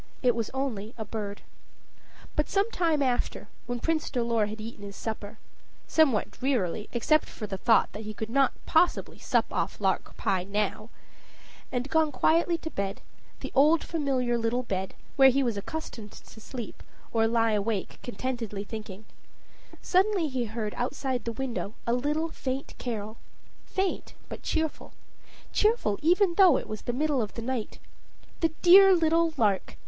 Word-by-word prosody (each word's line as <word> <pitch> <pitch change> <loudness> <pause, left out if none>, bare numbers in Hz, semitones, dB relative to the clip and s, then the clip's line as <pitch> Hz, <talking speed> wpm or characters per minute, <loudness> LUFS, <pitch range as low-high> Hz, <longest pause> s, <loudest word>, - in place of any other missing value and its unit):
It 245 -1 +5
was 230 -2 -2
only 240 -5 -3
a 220 - -4
bird. 205 -1 -5 0.9
But 300 - 0
some 405 +3 +1
time 325 -8 +1
after, 250 -2 -1 0.2
when 245 0 -2
Prince 320 +3 0
Dolor 235 -4 +1
had 215 +1 -7
eaten 215 -1 -8
his 200 -1 -8
supper 220 -1 -5 0.5
somewhat 275 -10 +3
drearily, 220 -6 -1
except 300 +6 +2
for 215 - -6
the 195 -2 -5
thought 230 -2 +4
that 210 - -7
he 215 -1 -6
could 220 +1 -5
not 270 0 +4
possibly 340 +2 +2
sup - - +2
off - - -2
lark - - -1
pie 190 -4 0
now 210 +2 -2 0.8
and 250 +1 -1
gone 315 +1 +2
quietly 335 +6 +2
to 320 0 -7
bed, 195 0 -3 0.4
the - - -5
old 300 +4 +5
familiar 260 -7 0
little 230 +2 0
bed, 190 -4 -3 0.2
where 270 -1 +8
he 275 +2 +2
was 235 -4 0
accustomed 220 -2 -6
to 220 - -14
sleep, 240 -1 -7 0.3
or 225 -1 +3
lie 230 0 +2
awake 210 -1 -1
contentedly 240 -5 -4
thinking 210 -1 -8 0.8
suddenly 380 -2 +3
he 255 -4 -2
heard 215 -1 -4
outside 255 0 -2
the 230 - -1
window 235 -3 -4
a 235 - +1
little 300 +6 0
faint 270 -2 -4
carol 220 -2 -4 0.5
faint 380 0 -2
but - - -7
cheerful 320 -1 -2 0.6
cheerful 425 - +2
even 355 +3 +4
though 360 -8 +8
it - - -4
was 215 0 -6
the - - -2
middle 285 +1 +1
of 210 - -4
the 230 - -4
night. 245 -3 -3 0.6
The 330 - +3
dear 380 +2 +9
little 330 -1 +2
lark! 205 -6 +1
245 Hz, 160 wpm, -28 LUFS, 215-310 Hz, 0.9 s, dear